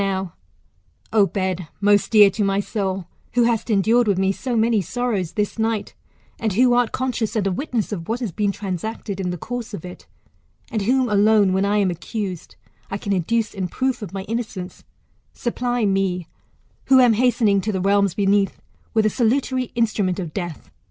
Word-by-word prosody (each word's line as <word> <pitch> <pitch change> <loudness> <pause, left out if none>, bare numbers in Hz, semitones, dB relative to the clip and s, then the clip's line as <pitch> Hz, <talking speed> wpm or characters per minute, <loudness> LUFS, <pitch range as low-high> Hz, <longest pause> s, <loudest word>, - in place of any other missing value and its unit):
Now, 190 -2 -2 0.8
O 205 -3 +5
bed, 185 -4 -2
most 205 0 +3
dear 210 -3 +7
to 210 +2 -1
my 195 0 +1
soul, 195 -3 -2 0.3
who 240 0 +4
hast 235 0 0
en 200 -3 +3
dured 235 +2 +3
with 200 -3 +2
me 190 0 +2
sp 245 +3 -3
many 225 -1 +3
sorrows, 215 -5 -2
[this 210 +1 -2
night] 225 -1 -1 0.5
and 220 -3 -1
who 245 +4 +4
art 245 -2 +2
con 260 0 -1
scious, 230 -1 -2
and 210 -3 +1
a 195 - +1
witness 235 +1 -2
of 170 -4 -5
what 230 +2 -1
has 235 -7 -3
been 205 +4 0
transacted 200 +1 -5
in 185 -2 -1
the 180 - -3
course 235 +3 -5
of 175 - -9
it, 180 - -10 0.6
and 220 - -1
whom 255 +5 +2
alone, 205 -2 +4
when 190 +1 +2
I 205 +1 +2
am 195 -3 +2
accused, 185 +1 -5 0.3
I 195 - -3
can 200 0 -2
adduce 215 +5 0
in 190 -3 -3
proof 255 +5 -1
of 205 - -6
my 195 0 -5
innocence, 215 -4 -5 0.5
supply 245 -1 -1
me, 190 -3 0 0.6
who 265 -1 +6
am 245 -3 +6
hastening 220 -4 +3
to 215 - -2
the 190 - -2
realms 200 0 +2
beneath, 200 0 +1 0.4
with 220 -1 +3
a - - +4
salutary 255 +2 0
instrument 210 -5 0
of 170 -4 -5
death. 175 -5 -6
205 Hz, 190 wpm, -22 LUFS, 190-230 Hz, 0.8 s, dear